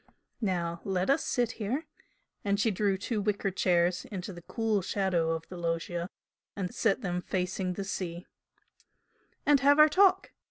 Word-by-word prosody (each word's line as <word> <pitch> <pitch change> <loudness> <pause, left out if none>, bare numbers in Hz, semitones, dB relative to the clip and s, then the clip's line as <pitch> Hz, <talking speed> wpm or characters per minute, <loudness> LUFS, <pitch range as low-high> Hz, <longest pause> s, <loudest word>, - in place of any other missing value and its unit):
Now 170 -5 -1
let 190 +4 +1
us 280 - +2
sit 240 -3 0
here" 255 +10 -1 0.6
and 200 0 +1
she 220 +1 +2
drew 200 0 +1
two 210 +2 -2
wicker 200 -1 0
chairs 175 -1 +2
into 195 -1 -6
the 175 - -10
cool 220 +2 0
shadow 185 -3 0
of 165 0 -2
the 180 - -9
loggia 170 +1 -2 0.5
and 185 -3 -3
set 210 -4 +1
them 180 -1 -2
facing 185 0 -2
the 200 - -4
sea 180 -2 -4 1.2
"and 290 -1 +5
have 285 +2 +5
our 305 0 +8
talk! 380 +2 +4
190 Hz, 160 wpm, -29 LUFS, 175-220 Hz, 1.2 s, our